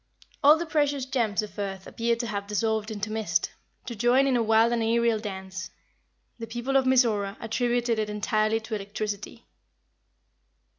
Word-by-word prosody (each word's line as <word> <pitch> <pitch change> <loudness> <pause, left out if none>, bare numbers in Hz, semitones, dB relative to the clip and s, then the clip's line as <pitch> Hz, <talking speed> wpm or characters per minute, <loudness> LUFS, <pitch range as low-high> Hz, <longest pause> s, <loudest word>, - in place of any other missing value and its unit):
All 295 +2 +8
the 340 - -3
precious 290 -4 0
gems 230 -6 0
of 205 -1 -9
earth 195 -1 -4
appear 235 0 0
to 235 +1 -4
have 200 -3 -4
dissolved 220 +1 -1
into 210 -1 -4
mist, 220 -1 0 0.3
to 235 - -5
join 245 +5 +3
in 270 -2 +2
a 240 - +2
wild 225 +1 +4
and 235 - 0
aerial 230 0 +2
dance. 190 -2 -6 0.7
The 230 - -6
people 240 +4 -3
of 270 -1 +4
Mizora 220 -6 +2
attributed 240 0 0
it 215 -1 -1
entirely 215 +1 0
to 220 +1 -8
electricity. 210 +2 -5
225 Hz, 160 wpm, -26 LUFS, 210-240 Hz, 0.7 s, All